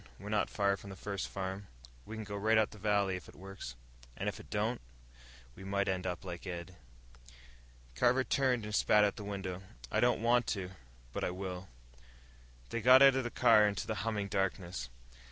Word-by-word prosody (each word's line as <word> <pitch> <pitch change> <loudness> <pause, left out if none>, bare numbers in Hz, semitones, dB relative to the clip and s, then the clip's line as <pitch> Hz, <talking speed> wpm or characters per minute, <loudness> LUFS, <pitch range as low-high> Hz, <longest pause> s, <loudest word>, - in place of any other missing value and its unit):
We're 100 - -8
not 105 -2 +1
far 100 -1 +1
from 100 - -11
the 95 - -7
first 100 0 -4
farm. 95 +1 -5 0.4
We 110 - -6
can 110 - -4
go 100 -1 -6
right 110 +2 +3
up 110 0 +3
the 105 - -12
valley. 100 -2 +1
If 90 - -12
it - - -15
works." 95 -10 -8 0.4
"And - - -3
if - - -3
it - - -13
don't?" - - -1 0.7
"We 95 - -11
might 100 +1 0
end 95 -1 -1
up 90 +1 -4
like 90 +1 -7
Ed." 90 0 -6 1.2
Carver 125 - +3
turned 130 -4 +1
and 105 - -6
spat 105 0 +5
out 105 - +2
the 105 - -7
window. 95 -2 -4 0.3
"I - - +2
don't 120 -2 +2
want 120 0 +3
to, 95 -1 -5 0.4
but - - -3
I - - +1
will." 90 0 -5 1.0
They 115 - -2
got 130 +3 +8
out 135 -1 +8
of 130 0 0
the 120 - -2
car, 105 -2 +5
into 100 -1 -2
the 110 - -2
humming 105 -3 -1
darkness. 90 -8 -2
100 Hz, 200 wpm, -33 LUFS, 95-110 Hz, 1.2 s, got